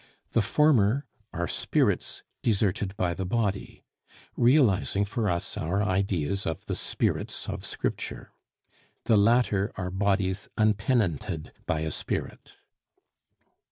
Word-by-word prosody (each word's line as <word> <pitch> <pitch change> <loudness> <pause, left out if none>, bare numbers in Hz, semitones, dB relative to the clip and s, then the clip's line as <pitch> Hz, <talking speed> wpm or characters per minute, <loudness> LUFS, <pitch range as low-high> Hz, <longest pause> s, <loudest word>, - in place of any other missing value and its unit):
The 115 - +3
former 140 -1 +3 0.3
are 85 +1 -2
spirits - - 0 0.2
deserted 100 -2 0
by 90 -4 +1
the 95 - -4
body, 100 0 -2 0.5
realizing 120 -6 +3
for 110 +1 -1
us 85 -1 -2
our 95 +6 0
ideas 95 -2 0
of 80 - -4
the - - -3
spirits - - -2
of - - -4
Scripture; - - -4 0.7
the 110 - +3
latter 105 -2 +3
are 90 -1 -4
bodies 95 0 0
untenanted 105 - 0
by 80 - 0
a 80 0 -2
spirit. - - -5
100 Hz, 115 wpm, -27 LUFS, 95-110 Hz, 0.7 s, The